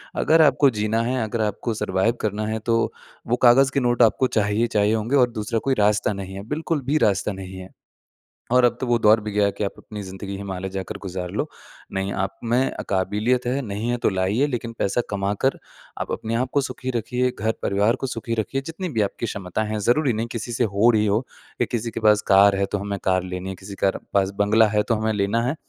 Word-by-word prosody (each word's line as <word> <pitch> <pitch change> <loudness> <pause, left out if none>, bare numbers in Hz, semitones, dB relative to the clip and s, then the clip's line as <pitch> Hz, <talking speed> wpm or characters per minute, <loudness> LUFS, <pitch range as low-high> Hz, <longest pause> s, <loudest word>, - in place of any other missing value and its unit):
अगर 160 +1 +4
आपको 145 -2 +5
जीना 110 -1 0
है, 125 +2 -1
अगर 110 +1 -2
आपको 110 +2 -1
सर्वाइव 105 +1 0
करना 105 0 -1
है 110 +1 -2
तो 115 +1 0 0.4
वो 120 - +2
कागज़ 135 +3 +6
के 140 - +2
नोट 120 -1 +1
आपको 115 +4 +3
चाहिए, 105 0 +1
चाहिए 105 -1 +2
होंगे 115 +5 0
और 125 -3 +5
दूसरा 110 +1 -2
कोई - - +4
रास्ता 105 0 +2
नहीं 95 -1 -7
है, 100 - -6
बिल्कुल 150 +1 -2
भी 145 +4 +2
रास्ता 100 +1 0
नहीं 95 0 -8
है। 95 0 -10 0.8
और 125 0 +5
अब 120 -1 +3
तो 130 - -2
वो 120 -1 +2
दौर 110 0 +5
भी 105 0 -5
गया 100 0 +3
कि - - -1
आप 100 - -1
अपनी 105 -1 -8
ज़िंदगी 95 +1 -7
हिमालय 95 -1 -5
जाकर 95 +2 -4
गुज़ार 90 -2 -5
लो। - - -2 0.5
नहीं 95 +1 -2
आप 95 0 -3
में 125 +3 +2 0.2
काबिलियत 105 +6 0
है, 130 +3 0
नहीं 105 +1 -4
है 120 - +1
तो - - +5
लाइए 100 +7 +1
लेकिन 120 -4 -4
पैसा 100 +5 +1
कमा 100 -1 -1
कर 135 - +2 0.4
आप - - -3
अपने 110 +1 -3
आपको 130 +4 +1
सुखी 130 -1 -4
रखिए, 125 +2 0
घर-परिवार 110 +1 +1
को 135 - -3
सुखी 115 -1 -3
रखिए 115 +4 -2
जितनी 180 +3 -4
भी 115 -9 -1
आपकी 105 +3 -2
क्षमता 100 -1 -3
हैं। 110 0 -3
ज़रूरी 125 +6 +2
नहीं 110 +1 -2
किसी 120 +1 -5
से 120 - +1
हो 110 +3 +3
रही 110 -2 +2
हो, 105 +2 +2 0.4
या - - +3
किसी 115 -1 -2
के 115 - -5
पास 105 -1 +4
कार 100 0 +6
है 100 0 +1
तो 105 - +1
हमें 100 0 -4
कार 95 -1 +2
लेनी 90 +1 -5
है, 95 - -4
किसी 95 +2 -10
कार 95 - +2 0.2
पास 100 -1 +3
बंगला 110 +2 +4
है 105 0 +2
तो 115 - 0
हमें 110 0 0
लेना 105 +3 0
है। 140 - 0
110 Hz, 230 wpm, -23 LUFS, 100-120 Hz, 0.8 s, कागज़